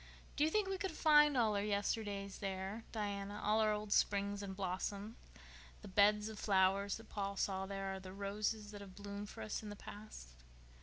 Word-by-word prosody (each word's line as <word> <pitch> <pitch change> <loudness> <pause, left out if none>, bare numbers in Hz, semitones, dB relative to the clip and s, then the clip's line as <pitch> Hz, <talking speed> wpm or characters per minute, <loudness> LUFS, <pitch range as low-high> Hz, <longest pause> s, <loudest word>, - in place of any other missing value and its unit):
"Do 295 - +2
you 310 - +4
think 415 +3 +2
we 385 -1 -2
could 385 -4 -2
find 295 -2 +6
all 220 -3 +3
our 200 - +1
yesterdays 205 -1 -1
there, 195 +3 -3
Diana—all 205 0 -1
our 215 -1 +4
old 210 -1 -1
springs 200 0 +2
and 195 -1 -5
blossoms? 200 +3 -3 0.7
The - - -7
beds 210 +2 +4
of 220 -1 -7
flowers 195 0 +3
that 225 0 -13
Paul 200 -1 -3
saw 190 -1 0
there 195 -1 -3
are 190 - -5
the 185 -1 -9
roses 205 +2 -2
that 205 -1 -8
have 190 -2 -10
bloomed 205 0 -6
for - - -7
us 110 - -3
in 215 - -7
the 205 - -6
past?" 205 - -10
205 Hz, 195 wpm, -37 LUFS, 195-215 Hz, 0.7 s, find